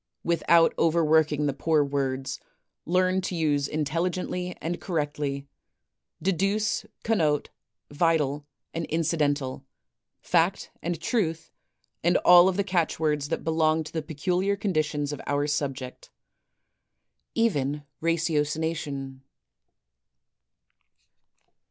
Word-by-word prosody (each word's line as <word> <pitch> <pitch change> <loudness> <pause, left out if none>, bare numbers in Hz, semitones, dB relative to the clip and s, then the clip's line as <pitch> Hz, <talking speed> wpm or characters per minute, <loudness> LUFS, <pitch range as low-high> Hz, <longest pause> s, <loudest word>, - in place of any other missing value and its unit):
Without 170 0 +4
overworking 155 -2 +3
the 140 - +1
poor 155 +1 +2
words, 135 -1 -2 0.5
learn 185 +2 +2
to 185 0 -3
use 145 -4 +1
intelli 155 +4 0
gently 180 0 -4
and 170 +2 -4
correctly 145 -4 -2 0.4
— - - -50
deduce, 205 +4 0 0.2
connote; 155 -10 +1 0.4
vital, 150 -2 +1 0.3
and 165 0 -3
incidental; 150 -5 0 0.6
fact, - - +1
and 170 -1 -3
truth; 165 -4 -1 0.5
and 175 +2 +4
all 180 +1 +8
of 190 - -2
the 200 - +2
catch 180 -5 0
words 150 -2 0
that - - -2
belong 160 0 +2
to 155 - -10
the 160 - -1
peculiar 180 +6 -1
conditions 155 -7 -1
of 145 - -6
our 145 0 +1
subject, 135 -3 -3 0.7
— - - -54
even 145 -7 -1 0.2
ratiocination. 155 -4 -1
160 Hz, 110 wpm, -26 LUFS, 145-175 Hz, 0.7 s, all